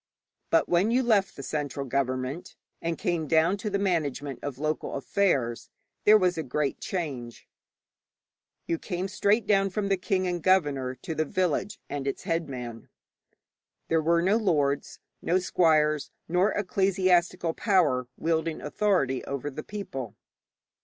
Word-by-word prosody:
But 165 - +3
when 175 +5 +3
you 250 +3 +2
left 215 -5 +2
the 140 - -8
central 145 -1 -3
government, 130 +3 -2 0.3
and 165 0 -2
came 175 -6 -1
down 165 +5 +3
to 210 +2 -3
the 200 - 0
management 150 -8 -1
of 145 -3 -5
local 155 +2 -2
affairs, 135 -6 0 0.4
there 215 +1 +8
was 180 -4 +1
a - - +1
great 140 0 -2
change. 135 -10 -5 1.2
You 165 - -1
came 185 0 -3
straight 205 +3 +2
down 195 -2 +3
from 200 +1 -2
the 195 - +2
king 185 0 0
and 175 -1 -2
governor 145 -8 +2
to 160 - -6
the 155 - 0
village 185 +4 -1
and 140 -1 -4
its 135 - -3
headman. 135 - -4 1.0
There 165 -1 +3
were 170 +2 +2
no 200 +4 +3
lords, 145 -10 0 0.2
no 175 - +2
squires, 155 -5 +2 0.2
nor 180 +4 +2
ecclesiastical 185 -3 +1
power 155 - +2
wielding 160 -1 -1
authority 150 -6 0
over 140 +1 -4
the 145 - -6
people. 135 - -6
165 Hz, 145 wpm, -27 LUFS, 140-190 Hz, 1.2 s, there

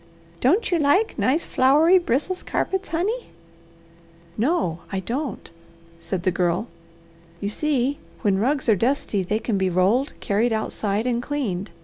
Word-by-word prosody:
Don't 355 - +2
you 345 - +2
like 315 +10 +2
nice, 290 +6 +2
flowery 305 +8 +5
Brissels 340 +4 -1
carpets, 385 +1 -2
honey?" 410 +9 -1 1.1
"No 230 - 0
I 195 - -1
don't," 245 - -4 0.5
said 185 -1 -4
the 185 - +2
Girl. 180 +4 0 0.7
"You 200 - -2
see, 280 +2 0 0.2
when 195 -2 +2
rugs 265 +5 0
are 220 - +5
dusty 230 -2 0
they 200 +4 -1
can 220 -2 -1
be 190 -1 +1
rolled, 195 +10 +2
carried 225 +2 +1
outside, 215 0 -1
and 240 -1 0
cleaned. 220 -9 -3
245 Hz, 140 wpm, -23 LUFS, 200-300 Hz, 1.1 s, flowery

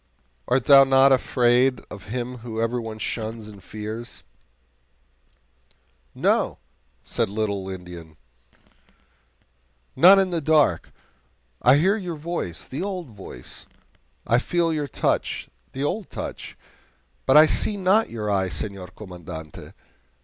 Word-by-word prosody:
Art 125 -1 +1
thou 140 -1 +9
not 135 0 +5
afraid 125 0 +3
of 100 - -9
him 125 +2 -5
whom 115 -1 -6
everyone 115 -1 -2
shuns 110 0 -4
and 105 -2 -12
fears?" 110 +4 -7 1.9
"No," - - +1 0.5
said 115 - -1
the 100 - -10
little 100 -3 -2
Indian, 90 -3 -8
readily, 80 -1 -23 1.8
"not 190 +4 +8
in 190 -1 +2
the 170 -2 -1
dark. 150 - +2 0.7
I - - +6
hear 190 +8 +3
your 180 -5 -5
voice 155 - -5
the 135 - -5
old 185 -6 -4
voice; 95 - -10 0.6
I 120 - +3
feel 170 +4 0
your 150 -2 -2
touch - - -1 0.2
the 135 - -4
old 200 +7 -2
touch; - - -7 0.7
but 135 - +6
I 155 - +9
see 205 +5 +1
not 200 +4 +2
your 110 -2 -5
eye, 95 -2 +1
Senor 90 +3 -5
Commandante. 90 -5 -10
120 Hz, 125 wpm, -24 LUFS, 100-150 Hz, 1.9 s, thou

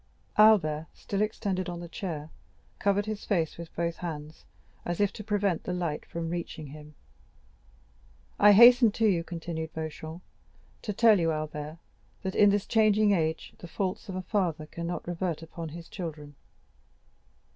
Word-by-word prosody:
Albert, 165 -8 +5
still 200 0 -3
extended 195 -4 -1
on 175 -1 -5
the 175 - -7
chair, 160 -4 -5 0.5
covered 200 0 +2
his 215 -1 -4
face 165 -6 0
with 170 -1 -9
both 170 0 -1
hands, 155 -3 -7 0.4
as 175 -1 -3
if 205 -1 +2
to 215 - -8
prevent 205 -4 0
the 180 - -3
light 170 -4 -3
from 165 -1 -4
reaching 170 -2 -5
him. 150 +1 -12 1.4
"I 205 0 +8
hastened 235 0 +8
to 225 - +2
you," 180 -6 +3
continued 165 -2 -5
Beauchamp, 160 +2 -6 0.6
"to 215 - -3
tell 215 0 +5
you, 165 -1 +2
Albert, 155 0 -4 0.5
that 190 -1 -2
in 205 - +6
this 205 0 +1
changing 215 -1 +4
age, 160 -4 0
the 175 - -9
faults 190 +4 -3
of 190 - -4
a 185 - -3
father 175 -5 -1
cannot 170 +3 -5
revert 175 -2 -2
upon 165 0 -7
his 165 +2 -9
children. 155 -5 -7
175 Hz, 155 wpm, -28 LUFS, 160-200 Hz, 1.4 s, I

